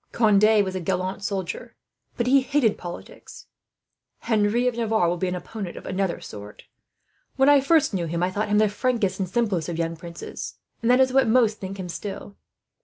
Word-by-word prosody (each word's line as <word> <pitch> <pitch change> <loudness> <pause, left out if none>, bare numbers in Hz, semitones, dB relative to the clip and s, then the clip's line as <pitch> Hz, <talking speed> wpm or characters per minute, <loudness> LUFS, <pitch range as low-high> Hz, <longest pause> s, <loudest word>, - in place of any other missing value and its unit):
Conde 215 -1 +4
was 190 - -4
a 185 - -3
gallant 185 +2 -2
soldier, 195 -3 -4 0.4
but 235 - 0
he 270 +2 +5
hated 260 -5 +1
politics. 175 -1 -10 0.8
"Henry 225 +2 +1
of 250 - 0
Navarre 220 -5 +1
will 175 - +1
be 185 - -1
an 180 - -2
opponent 185 +1 -7
of - - -10
another 185 -2 -1
sort. 105 0 -10 0.7
When 270 0 +3
I 285 -1 +6
first 295 -3 +3
knew 175 -3 -1
him, 170 +2 -2
I 180 - 0
thought 210 +2 -2
him 210 - +3
the 215 0 +4
frankest 205 -3 -1
and 190 -2 -2
simplest 195 -6 0
of 170 - -4
young 165 0 -2
princes; 170 +1 -8 0.3
and 230 - 0
that 250 +1 +5
is 260 -1 +3
what 265 -2 +4
most 225 -2 +3
think 195 0 -7
him, 185 - -4
still. 200 +3 -7
205 Hz, 195 wpm, -24 LUFS, 180-235 Hz, 0.8 s, I